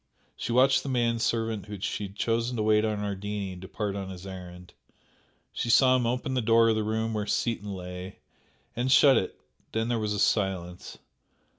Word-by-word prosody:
She 115 - -4
watched 130 +2 +4
the 140 - -6
man 120 -2 +1
servant 115 -3 -1
whom 105 -1 -7
she 105 - -2
had 100 0 -10
chosen 115 +3 -1
to 110 - 0
wait 105 0 +3
on 105 -2 -1
Ardini 100 -1 -4
depart 100 +2 -4
on 95 -1 -5
his 95 0 -9
errand 90 -2 -10 0.8
she 120 - -3
saw 130 +2 +6
him 125 -2 +1
open 125 +3 -2
the 130 - +1
door 115 0 +4
of 110 - +2
the 110 - 0
room 110 +1 -1
where 105 -1 -2
Seaton 105 -3 -1
lay, 90 0 -7 0.6
and 125 +2 0
shut 135 0 +7
it 95 - -1 0.3
then 110 +1 -1
there 120 -1 0
was 105 -1 -1
a 105 - -2
silence. 95 -4 -1
110 Hz, 190 wpm, -27 LUFS, 95-115 Hz, 0.8 s, shut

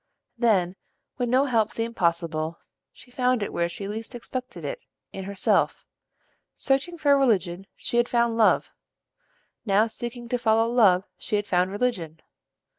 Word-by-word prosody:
Then, 200 -6 +2 0.4
when 245 -2 -1
no 260 +3 +4
help 225 -5 +2
seemed 230 0 -3
possible, 165 -2 0 0.3
she 245 - -16
found 250 -3 +1
it - - -5
where 170 0 0
she 195 +3 -6
least 225 +4 -6
expected 255 +1 -6
it, - - -4 0.3
in 190 -1 -6
herself. 200 -1 +1 0.7
Searching 275 +6 0
for 290 -3 +4
religion, 195 -8 +1
she 240 - -3
had 240 0 +3
found 235 -1 +2
love: 225 -2 +3 0.9
now 210 0 +3
seeking 240 +1 -6
to 245 - 0
follow 225 -1 +3
love 205 -6 +4 0.2
she 210 - -1
found 180 -2 +1
religion. 190 -7 -2
225 Hz, 145 wpm, -25 LUFS, 190-245 Hz, 0.9 s, no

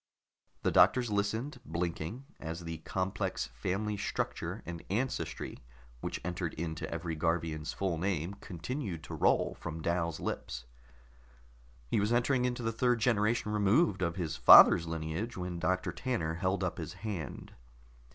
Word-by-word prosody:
The - - +2
doctors 125 -3 +5
listened, 110 +7 -1
blinking, 85 +8 -3
as 80 +2 -5
the 80 -1 -5
complex 95 -9 -2
family 100 - -2
structure 100 - -3
and 85 -1 -6
ancestry 120 +7 -2 0.4
which - - -4
entered 90 -2 -3
into 80 -1 -4
every 85 0 -3
Garvian's 80 -1 -1
full 90 -4 -1
name 90 -1 -1
continued 95 - -5
to - - -8
roll - - +2
from 80 - -5
Dal's 85 -2 0
lips. - - -4 1.3
He - - +3
was 105 +2 +1
entering 125 +1 +2
into 125 -1 -2
the 115 - 0
third 125 +1 +2
generation 110 -1 +2
removed 105 - +3
of 85 -1 0
his 80 -4 -2
father's 85 - +9
lineage 80 +8 -3
when 90 -1 -4
Doctor 90 +1 0
Tanner 90 -12 -2
held 95 +3 0
up 90 - -2
his 80 0 -5
hand. 90 - -5
90 Hz, 140 wpm, -32 LUFS, 80-110 Hz, 1.3 s, father's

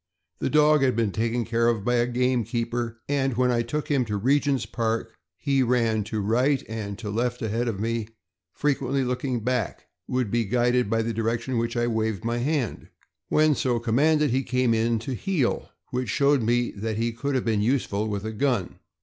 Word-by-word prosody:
The - - -1
dog 150 0 +5
had 130 -3 +2
been 115 -3 +1
taken 115 +3 -1
care 115 0 +1
of 115 -4 0
by 120 0 +2
a 120 0 +2
gamekeeper, 120 -1 -1
and 135 -4 0
when 125 0 +3
I 120 -1 +2
took 150 +5 -3
him 140 -4 +2
to 105 -2 -2
Regent's 135 +3 +2
Park 115 -1 -2 0.2
he 140 -2 +1
ran 115 -3 +2
to 110 0 -3
right 125 +7 +2
and 105 -3 -5
to 105 -3 -5
left 120 +3 -1
ahead 115 +3 -1
of 105 -4 -2
me, 115 +2 0
and - - -22 0.4
frequently 135 -2 0
looking 125 -1 -2
back, 125 -4 -2 0.2
would 125 -5 -1
be 120 -1 +1
guided 120 +1 +2
by 115 0 +1
the 115 +1 -2
direction 115 +3 -1
in 120 - +1
which 115 +1 -2
I 120 - +2
waved 110 -3 -1
my 120 +1 0
hand. 135 - -1 0.4
When 155 0 +4
so 125 -3 0
commanded 145 +6 +2
he 130 +2 +2
came 125 -2 +1
in 115 +1 +1
to 135 - -2
heel, 145 - -1 0.2
which 125 -2 -2
showed 140 +4 +3
me 120 +2 +1
that 110 +1 -4
he 115 +1 0
could 135 +5 -3
have 130 - 0
been 110 -3 +1
useful 110 -3 0
with 105 -1 -3
a 110 - -3
gun. 120 -6 -1
120 Hz, 200 wpm, -25 LUFS, 115-130 Hz, 0.4 s, dog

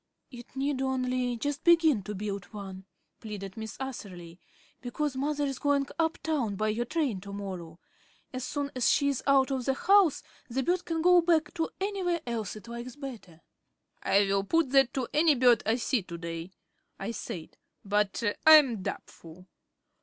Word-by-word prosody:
"It 245 0 -12
need 270 0 -1
only 255 -2 -1
just 290 +4 -3
begin 325 -9 +5
to 210 - -5
build 200 0 -4
one," 195 -2 -9 0.3
pleaded 195 -3 -7
Miss 220 -1 -7
Atherley, 185 -10 -7 0.4
"because 265 +3 -3
Mother's 285 -1 -1
going 285 -1 +2
up 325 0 +1
town 280 -10 -1
by 215 +2 0
your 230 +3 -1
train 250 - -1
to 200 +1 -9
morrow. 185 -5 -7 0.5
As 255 -1 -4
soon 285 +2 -3
as 255 - +2
she's 280 -2 +2
out 275 -1 +4
of 260 -2 -2
the 270 - +1
house 390 -2 +4 0.3
the 265 +3 -1
bird 355 +2 0
can 325 -1 -2
go 360 0 +6
back 330 -2 +2
to 325 -1 -1
anywhere 380 -4 -1
else 225 -5 -3
it 215 +2 -11
likes 235 +2 -7
better." 235 - -9 0.6
"I 200 +1 +3
will 195 0 +1
put 320 +5 +1
that 270 -2 +5
to 260 -3 -1
any 305 0 +4
bird 245 -3 +5
I 220 - +3
see 245 -1 0
to 170 -2 -8
day," 165 0 -6 0.5
I 200 +4 -4
said, 170 -7 -7 0.3
"but 205 +2 0 0.2
I 315 - +11
am 265 -9 +6
doubtful." 170 -1 -8
255 Hz, 170 wpm, -29 LUFS, 205-290 Hz, 0.6 s, I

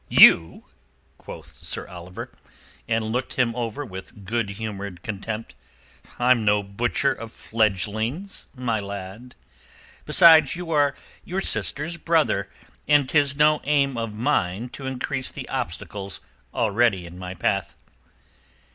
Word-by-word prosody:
"You?" 80 0 +7 0.5
quoth - - -10
Sir - - -4
Oliver, 90 +1 -9 0.6
and 115 -1 0
looked 125 +2 -2
him 120 -3 +1
over 120 +3 -3
with 95 -1 -10
good 115 +1 -1
humoured 100 -3 -6
contempt. 110 0 -5 0.6
"I'm 125 -2 +3
no 105 0 +3
butcher 120 +7 0
of 115 -3 -9
fledgelings, 110 - -1
my 120 -4 -1
lad. 100 +4 -8 0.7
Besides, 160 -4 +7
you 175 -1 -6
are 145 -2 +3 0.3
your 185 +2 -3
sister's 170 -3 0
brother, 155 - +1 0.4
and 145 -2 +4
'tis 140 -1 +3
no 150 +1 +4
aim 140 -2 +2
of 115 -2 -3
mine 115 -3 0
to 135 +2 -8
increase 130 0 -2
the - - -8
obstacles 100 -4 -4 0.3
already 115 -5 +1
in 85 +1 -11
my 90 0 -6
path." 95 +1 -1
115 Hz, 125 wpm, -24 LUFS, 100-140 Hz, 0.7 s, You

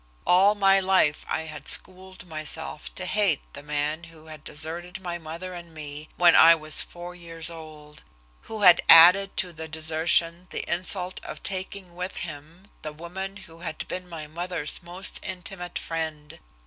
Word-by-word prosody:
All 195 +4 +5
my 195 -1 +4
life 185 -5 +2
I - - -1
had 155 -2 -9
schooled 185 0 -4
myself 155 -1 -5
to 185 - -4
hate 195 -6 +1
the 140 - -8
man 150 +3 -2
who 165 -1 -16
had 155 -1 -11
deserted 170 +4 -5
my 175 -2 -5
mother 170 +3 -7
and 170 -2 -11
me 150 0 -8
when 175 -1 +6
I 165 +1 +8
was 155 -1 +4
four 175 0 -8
years 165 -1 -6
old, 155 -2 -12 0.5
who 220 -1 -5
had 180 -3 +7
added 180 +4 +8
to 180 -2 0
the 160 0 -7
desertion 160 +2 +1
the - - -4
insult 180 +1 0
of - - -9
taking 185 -1 -5
with 180 +1 -5
him 160 +2 -8 0.2
the 155 -1 -6
woman 190 +5 -7
who 165 0 -15
had 165 -2 -6
been 180 -1 -6
my 160 -3 -7
mother's 165 0 -3
most 175 +2 -2
intimate 180 -1 -6
friend. 160 -2 -5
170 Hz, 165 wpm, -25 LUFS, 155-185 Hz, 0.5 s, I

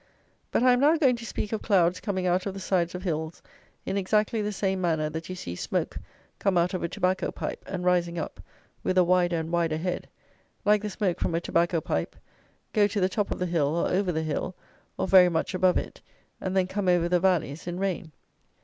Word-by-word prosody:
But - - +1
I 255 - +6
am 245 - +2
now 300 +4 +5
going 265 -6 +4
to 235 - -8
speak 210 - -3
of 220 - -2
clouds 185 -4 +3
coming 190 -3 -2
out 180 +2 +1
of 195 - -4
the - - -5
sides 180 -2 0
of 180 - -6
hills 160 -2 -3 0.4
in 195 - -1
exactly 210 +3 +1
the 210 0 -1
same 190 -2 -1
manner 160 -3 0
that 160 +2 -6
you 185 - -4
see 85 - -6
smoke - - -2 0.4
come 195 -3 +2
out 175 +2 +2
of 185 - -2
a 170 - -2
tobacco 185 +2 0
pipe, - - -5
and 185 -2 -4
rising 175 -1 +2
up, 160 - -5 0.4
with 185 - -1
a 185 - +7
wider 175 -1 +2
and 160 0 -4
wider 165 -2 +1
head, 175 +2 -3 0.6
like 210 0 +4
the 210 - -3
smoke 190 -3 -1
from 165 - 0
a - - +2
tobacco 170 0 +1
pipe, 80 - -2 0.6
go 205 -1 +4
to 205 0 -2
the 185 0 +2
top 205 +1 -1
of - - -3
the 180 - -1
hill 160 -4 +1
or 170 - +1
over 185 0 +1
the 160 -1 -1
hill, 155 +4 -3 0.4
or - - -1
very 185 -1 +7
much 165 +1 -1
above 185 0 +3
it, - - -5 0.4
and 190 0 -1
then 185 - +3
come 190 +1 -3
over 175 -1 +3
the 180 0 +2
valleys 170 -4 0
in 175 0 -3
rain. 185 -4 -2
180 Hz, 230 wpm, -27 LUFS, 170-195 Hz, 0.6 s, a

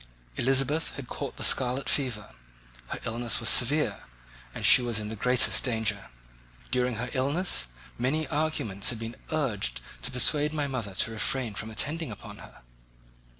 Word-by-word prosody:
Elizabeth 135 +5 +1
had 135 -3 -8
caught - - -6
the - - -7
scarlet 130 +1 +3
fever; 120 - -1 0.6
her - - -6
illness 115 +1 -1
was 115 - +2
severe, 130 -4 +3 0.5
and - - -5
she - - +7
was 120 -2 0
in 105 0 -3
the 110 - -5
greatest 125 +4 +3
danger. 110 -5 -2 0.6
During 125 -1 0
her 120 +2 -5
illness 140 - +1 0.3
many 145 +5 0
arguments 145 -10 0
had 120 - -3
been 115 +1 -7 0.2
urged 115 - -1 0.2
to 65 - -1
persuade 150 +4 +4
my 150 -2 -1
mother 120 -8 -5
to 115 - 0
refrain 115 +1 -1
from 110 +2 -6
attending 145 +8 -1
upon 105 - -10
her. - - -15
125 Hz, 155 wpm, -27 LUFS, 110-140 Hz, 0.6 s, she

